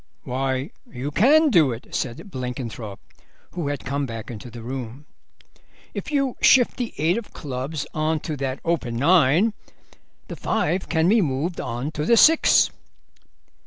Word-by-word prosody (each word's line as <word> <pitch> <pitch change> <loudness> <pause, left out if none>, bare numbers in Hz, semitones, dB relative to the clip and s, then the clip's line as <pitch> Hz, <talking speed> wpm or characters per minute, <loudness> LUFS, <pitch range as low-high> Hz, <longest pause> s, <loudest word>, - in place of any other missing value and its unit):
"Why, 130 +1 -2 0.2
you 130 +3 -5
can 295 - +5
do 160 - +5
it," 115 0 -9
said 130 - -4
Blenkinthrope, 125 - -6 0.5
who 170 -5 -4
had 145 -1 -4
come 140 +1 -2
back 115 0 -7
to 120 - -10
the 115 -1 -10
room; 130 +2 -6 0.9
"if - - -5
you 275 -3 0
shift 250 -3 +5
the 245 -3 -3
eight 165 +8 +1
of 235 - -13
clubs 140 +2 -4
on 155 0 0
to 155 - -4
that 135 0 -3
open 155 -8 -1
nine 165 - +4 0.7
the - - -6
five 185 - -1
can 160 0 +2
be 220 +3 +4
moved 155 +3 -2
on 125 +4 -4
to 150 -1 -3
the 230 +9 +4
six." 320 +7 +6
145 Hz, 155 wpm, -23 LUFS, 125-180 Hz, 0.9 s, six